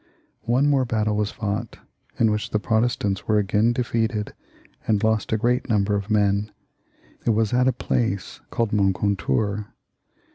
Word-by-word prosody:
One 130 +5 +3
more 140 -2 +3
battle 110 -3 0
was 105 0 0
f6ught, 105 +2 -3 0.4
in 110 -2 +3
which 105 0 -2
the - - +1
Protestants 110 -3 0
were 110 - +3
again 105 +3 +2
defeated 115 -3 -1 0.5
and 105 -2 +2
lost 110 -1 +1
a 110 - +2
great 125 +3 0
number 105 -2 +2
of 100 0 -2
men. 105 0 +1 0.7
It - - 0
was 110 +1 +1
at 125 +1 +3
a - - +5
place 115 -6 -2
called 115 -3 -1
Moncontour. 100 0 0
105 Hz, 150 wpm, -23 LUFS, 100-115 Hz, 0.7 s, a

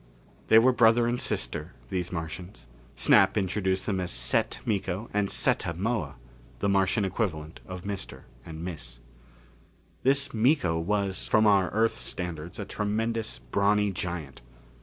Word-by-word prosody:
They 110 - +7
were 125 +3 +6
brother 120 -1 +4
and 120 +1 0
sister, 75 +8 -3 0.2
these 90 -2 -2
Martians. 90 0 -6 0.3
Snap - - +4
introduced 95 -1 0
them 100 -3 -1
as 90 -1 -3
Set - - 0
Miko 100 0 -2
and 105 -1 +1
Setta 85 - +1
Moa 110 +3 -2 0.4
the 100 - -1
Martian 100 +1 +2
equivalent 80 -6 -3
of 90 -1 -7
Mr. 100 -1 -5 0.2
and 80 0 -8
Miss. 65 -9 -7 1.0
This 140 +1 +2
Miko 115 - +2
was, 100 +2 -1
from 110 0 +4
our 100 -3 +4
Earth 110 +1 +1
standards, 85 -2 -6
a 105 - -4
tremendous, 110 +3 -2
brawny 100 +11 +1
giant. 85 -7 -5
95 Hz, 140 wpm, -27 LUFS, 85-110 Hz, 1.0 s, They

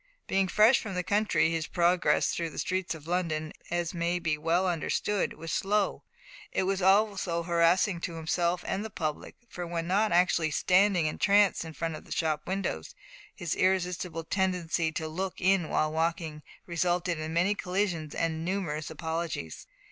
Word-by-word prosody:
Being 195 0 +1
fresh 215 +7 +5
from 200 -4 -6
the 180 - -1
country, 205 -3 +2
his 165 -2 -2
progress 175 0 +2
through 170 -1 -2
the - - -12
streets 185 -2 -1
of 155 -2 -12
London, 160 -3 -1 0.2
as 175 0 -1
may 170 0 0
be 165 -3 0
well 165 +5 +1
understood, 180 +3 0
was 165 0 -7
slow. 205 +3 0 0.5
It - - 0
was 195 +1 0
also 195 -3 +2
harassing 170 +2 +2
to 170 - -4
himself 170 +2 0
and 200 - -2
the 220 - -5
public, 155 -6 -4
for 175 -5 -6
when 170 -1 -3
not 205 +5 +2
actually 170 -2 +3
standing 185 +2 +3
entranced 200 +5 +3
in 160 -1 -8
front 165 0 -3
of - - -12
shop 155 -2 -1
windows 185 - -3 0.4
his 170 -2 -3
irresistible 180 -3 0
tendency 175 -2 0
to 160 0 -3
look 185 +4 -4
in 190 -3 +2
while 155 0 +1
walking 160 -1 -1 0.2
resulted 175 0 0
in 155 0 -4
many 175 +5 +2
collisions 180 -6 -2
and 160 -1 -1
numerous 165 -5 -2
apologies. 160 - -4
175 Hz, 165 wpm, -29 LUFS, 160-190 Hz, 0.5 s, fresh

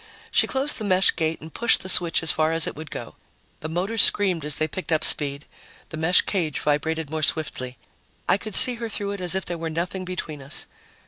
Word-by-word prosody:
She - - +3
closed 270 +1 +3
the - - -6
mesh 190 -2 +2
gate 160 -1 -3
and 160 +1 -12
pushed 235 -1 +2
the - - -8
switch 175 -3 +2
as 160 - +3
far 155 0 0
as 165 -2 -1
it - - -5
would 155 0 -10
go. - - -9 0.4
The 155 - -7
motors 195 +7 0
screamed 185 -6 +4
as 150 -1 +4
they 155 - +3
picked 180 +3 -7
up 155 -1 +1
speed; 140 -1 +4 0.4
the - - -8
mesh 160 +3 +3
cage 165 -7 -3
vibrated 155 +1 -2
more 160 0 -3
swiftly; 130 -5 -2 0.5
I 195 - +2
could 215 -1 -7
see 250 - +5
her 230 - -4
through 200 -1 -4
it 200 -2 -7
as 180 0 +2
if 190 - -2
there 175 -1 -5
were 165 0 -4
nothing 175 +4 -4
between 175 -5 -7
us. 135 +2 -2
165 Hz, 230 wpm, -23 LUFS, 155-190 Hz, 0.5 s, see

